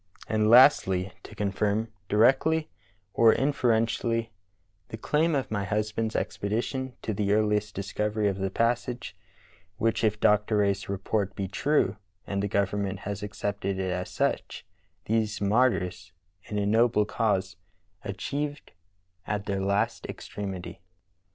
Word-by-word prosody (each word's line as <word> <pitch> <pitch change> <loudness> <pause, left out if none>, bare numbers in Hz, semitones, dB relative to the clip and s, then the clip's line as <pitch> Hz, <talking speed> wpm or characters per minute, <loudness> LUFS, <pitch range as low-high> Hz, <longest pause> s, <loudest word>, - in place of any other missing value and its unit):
And 110 0 +1
lastl}^, 100 -6 +6
to - - -12
confirm, 105 +2 0 0.2
directly 135 +9 +3 0.4
or 115 -1 +6
in 140 +2 +1
ferentially, 115 -1 +1 0.6
the 110 - -7
claim 155 +7 +1
of 135 -4 -2
my 100 -2 -1
husband's 105 +2 -1
expedition 120 +5 -2
to 110 - -2
the 100 0 0
earliest 105 -1 +1
discovery 105 +2 -1
of 100 -1 -1
the 95 0 -1
passage, 120 +3 -1 0.6
which, 115 0 0
if 105 -1 +1
Dr. 105 +1 +3
Rae's 100 -1 +1
report 100 0 -1
be 95 - -3
true 105 0 +1 0.3
(and 100 -1 -2
the 100 - 0
government 100 0 -1
has 100 0 -5
accepted 100 -1 -3
it 95 -1 -1
as 90 0 -3
such), - - -2 0.4
these 110 -1 0
martj^rs 100 -6 +1 0.3
in 105 - -4
a 100 - +1
noble 110 0 +3
cause 95 -5 0 0.5
achieved 145 +9 -4 0.6
at 105 -1 -2
their 100 -1 -1
last 100 +1 0
extremity." 95 -4 -6
105 Hz, 130 wpm, -27 LUFS, 100-115 Hz, 0.6 s, lastl}^